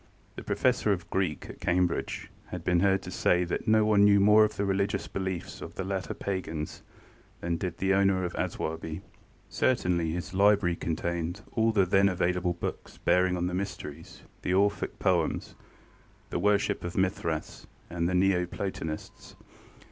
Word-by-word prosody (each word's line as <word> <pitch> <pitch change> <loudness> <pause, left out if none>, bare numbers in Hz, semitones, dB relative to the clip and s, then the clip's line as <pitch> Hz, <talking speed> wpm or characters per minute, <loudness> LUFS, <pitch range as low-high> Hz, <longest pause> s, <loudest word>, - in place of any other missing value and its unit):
The - - -7
Professor - - +1
of - - -2
Greek 95 -5 -1
at - - -10
Cambridge 90 -1 -1 0.2
had - - -6
been 90 -1 +2
heard 95 +1 +2
to - - -7
say 90 0 +2
that 85 +6 -3
no 110 0 +5
one 105 -1 +5
knew 100 0 +6
more 105 +2 +7
of 105 - 0
the 100 - 0
religious 100 0 0
beliefs 95 -2 -4
of - - -8
the 95 - -3
later 95 0 -3
pagans 80 -6 -4 0.6
than 85 0 -1
did 90 -1 -4
the 95 0 +1
owner 95 -1 +3
of 90 - -4
Aswarby. 80 0 -3 0.4
Certainly 90 -10 +1
his 90 +3 -4
library 100 -2 +4
contained 85 +2 -3
all 115 0 +2
the 100 -4 +3
then 95 +2 +4
available 90 -1 0
books 85 - -6
bearing 90 0 +2
on 90 - -1
the 90 - -2
Mysteries, 90 -6 -6 0.2
the 90 - 0
Orphic 100 +1 +1
poems, - - 0 0.8
the - - -1
worship 100 +1 +1
of 85 0 -5
Mithras, 90 -4 -2 0.2
and 85 0 -1
the 90 - 0
Neo 90 -1 +3
Platonists. 85 -4 -6
95 Hz, 165 wpm, -28 LUFS, 85-100 Hz, 0.8 s, more